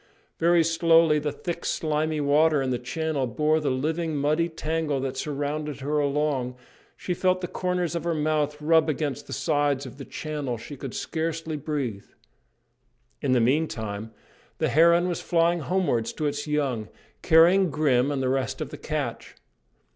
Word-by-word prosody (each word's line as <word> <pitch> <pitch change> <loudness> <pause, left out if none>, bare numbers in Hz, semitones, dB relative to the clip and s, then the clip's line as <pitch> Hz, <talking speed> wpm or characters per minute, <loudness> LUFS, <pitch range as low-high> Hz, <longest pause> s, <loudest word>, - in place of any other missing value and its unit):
Very 170 0 +4
slowly 165 -1 +4
the 150 0 -2
thick 170 +2 -5
slimy 155 0 -1
water 150 +1 +3
in 130 - -1
the 125 - -1
channel 140 +2 -2
bore 155 +6 +1
the 150 - -1
living, 155 +5 -1
muddy 155 +4 +1
tangle 160 -3 -2
that 135 0 -3
surrounded 145 +1 -3
her 150 +2 0
along; 140 -3 0 0.4
she 180 - -3
felt 185 +1 +1
the 180 - -2
corners 180 -1 -2
of 170 -2 -3
her 170 -1 0
mouth 150 -1 0
rub 160 +1 +3
against 145 -3 -2
the - - -6
sides 145 -3 0
of 130 +1 -10
the - - -6
channel; 145 -6 -4
she 145 +6 -9
could 135 -2 -7
scarcely 160 -1 -3
breathe. 140 -9 -3 1.2
In 135 -2 +1
the 125 - +4
meantime 115 -5 -1 0.5
the - - 0
heron 170 +3 +5
was 175 -2 -2
flying 170 0 +2
homewards 150 -7 0
to 155 - -3
its 145 +1 -2
young, 135 -8 -1 0.3
carrying 175 +3 +5
Grim 140 -4 +2
and 140 -2 -1
the - - +1
rest 130 -3 -1
of - - -4
the - - -8
catch. - - -4
150 Hz, 165 wpm, -26 LUFS, 140-165 Hz, 1.2 s, heron